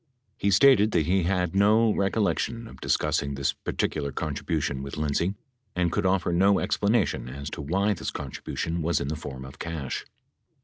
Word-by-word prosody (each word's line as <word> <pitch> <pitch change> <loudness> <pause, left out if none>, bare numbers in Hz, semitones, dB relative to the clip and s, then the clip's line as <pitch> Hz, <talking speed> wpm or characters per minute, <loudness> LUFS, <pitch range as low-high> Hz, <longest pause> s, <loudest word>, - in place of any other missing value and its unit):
He 100 - +1
stated 110 +1 +6
that 80 -4 +2
he 95 +4 +2
had 90 -1 0
no 105 +2 +4
recollection 105 +3 0
of - - -13
discussing 70 0 0
this 70 0 0
par - - -6
ticular 70 -2 -2
contribution 75 -2 -2
with 70 +1 -6
Lindsay 75 +6 0 0.4
and 90 -2 +1
could 100 0 +1
offer 95 -2 +1
no 95 +3 +4
explanation 105 - +1
as 70 +3 -6
to - - -5
why 95 +8 +1
this 95 - -4
contribution 85 +1 -4
was 80 -1 +1
in 70 - -3
the 80 - -2
form 65 -3 -7
of 65 +2 -12
cash. 80 -6 -4
85 Hz, 175 wpm, -26 LUFS, 75-100 Hz, 0.4 s, stated